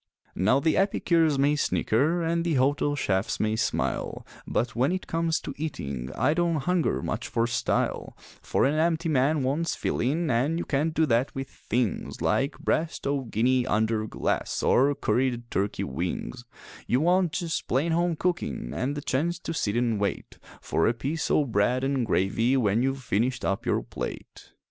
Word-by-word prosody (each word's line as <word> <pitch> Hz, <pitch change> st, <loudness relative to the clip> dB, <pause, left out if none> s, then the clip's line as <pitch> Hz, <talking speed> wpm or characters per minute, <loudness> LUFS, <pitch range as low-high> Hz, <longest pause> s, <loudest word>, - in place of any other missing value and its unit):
Now 110 Hz, +8 st, +3 dB
the 160 Hz, +2 st, +1 dB
epicures 170 Hz, -6 st, +2 dB
may 140 Hz, +2 st, +3 dB
snicker 150 Hz, +4 st, +1 dB
and 165 Hz, +1 st, 0 dB
the 170 Hz, -3 st, 0 dB
hotel 145 Hz, +2 st, +2 dB
chefs 95 Hz, -7 st, -1 dB
may 110 Hz, 0 st, +1 dB
smile, -, -, -2 dB, 0.2 s
But 120 Hz, +2 st, -1 dB
when 130 Hz, +6 st, +2 dB
it 185 Hz, 0 st, -2 dB
comes 165 Hz, 0 st, 0 dB
to -, -, -6 dB
eating 70 Hz, -, -4 dB
I 150 Hz, -, +2 dB
don't 170 Hz, 0 st, +1 dB
hunger 170 Hz, +4 st, 0 dB
much 115 Hz, +2 st, -3 dB
for 115 Hz, -1 st, 0 dB
style; 120 Hz, 0 st, -1 dB, 0.2 s
For -, -, +1 dB
an 140 Hz, -, +2 dB
empty 165 Hz, +1 st, +1 dB
man 145 Hz, +1 st, +2 dB
wants 150 Hz, +6 st, 0 dB
fillin' 155 Hz, +5 st, 0 dB
an' 135 Hz, +8 st, +1 dB
you 175 Hz, -, -3 dB
can't 155 Hz, +3 st, 0 dB
do 160 Hz, -, +3 dB
that 125 Hz, -1 st, +1 dB
with 135 Hz, 0 st, -5 dB
things 120 Hz, -4 st, -2 dB
Like 135 Hz, +2 st, 0 dB
breast 160 Hz, 0 st, -1 dB
o' 140 Hz, -1 st, 0 dB
guinea 125 Hz, +3 st, +1 dB
under 110 Hz, 0 st, +1 dB
glass, -, -, -2 dB
or 140 Hz, +3 st, +4 dB
curried 125 Hz, -3 st, -1 dB
turkey 100 Hz, +1 st, -1 dB
wings 90 Hz, -, -4 dB, 0.4 s
You 125 Hz, +3 st, +2 dB
want 175 Hz, 0 st, +2 dB
just 170 Hz, -4 st, -2 dB
plain 145 Hz, +7 st, +1 dB
home 170 Hz, +1 st, +1 dB
cookin' 150 Hz, -, -2 dB
an' 135 Hz, +3 st, -2 dB
the 145 Hz, -, -4 dB
chance 160 Hz, +6 st, 0 dB
to 165 Hz, -, -4 dB
sit 110 Hz, -8 st, -1 dB
an' 115 Hz, -3 st, +1 dB
wait 100 Hz, -1 st, -3 dB, 0.2 s
For 80 Hz, -, +1 dB
a 115 Hz, -, +1 dB
piece 145 Hz, +7 st, -2 dB
o' 150 Hz, -, +3 dB
bread 120 Hz, +2 st, +1 dB
an' 135 Hz, -2 st, 0 dB
gravy 115 Hz, +6 st, +1 dB
when 110 Hz, -2 st, +2 dB
you've 135 Hz, +1 st, -1 dB
finished 120 Hz, +4 st, 0 dB
up 95 Hz, -, -1 dB
your -, -, +1 dB
plate. -, -, -7 dB
135 Hz, 175 wpm, -26 LUFS, 115-160 Hz, 0.4 s, or